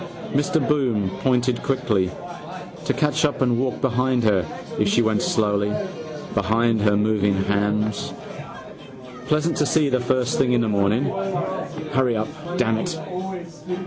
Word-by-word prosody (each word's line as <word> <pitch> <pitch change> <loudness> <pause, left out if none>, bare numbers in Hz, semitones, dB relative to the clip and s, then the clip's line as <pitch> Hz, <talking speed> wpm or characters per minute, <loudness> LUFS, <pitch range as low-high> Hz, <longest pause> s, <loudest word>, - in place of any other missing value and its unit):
Mr 145 +1 +1
Bloom 120 -10 +1
pointed 125 -1 +1
quickly. 105 -8 +1 0.8
To - - +1
catch 150 -2 +1
up 145 -2 +1
and 120 -2 +2
walk 130 0 -1
behind 125 -1 +1
her 100 -5 +3 0.4
if 105 - +3
she 120 +4 +3
went 110 -1 +1
slowly, 105 -1 +1 0.6
behind 110 +2 +2
her 105 -1 +3
moving 105 -1 +2
hams. 105 +1 0 1.2
Pleasant 155 +3 +1
to 150 - +2
see 150 -2 +2
first 125 0 +1
thing 125 -1 +3
in 120 - +3
the 115 - +1
morning. 105 +5 +2 0.9
Hurry 130 -4 +2
up, 110 - -1 0.3
damn 115 -2 +2
it. 165 +6 -3
115 Hz, 135 wpm, -23 LUFS, 105-130 Hz, 1.2 s, her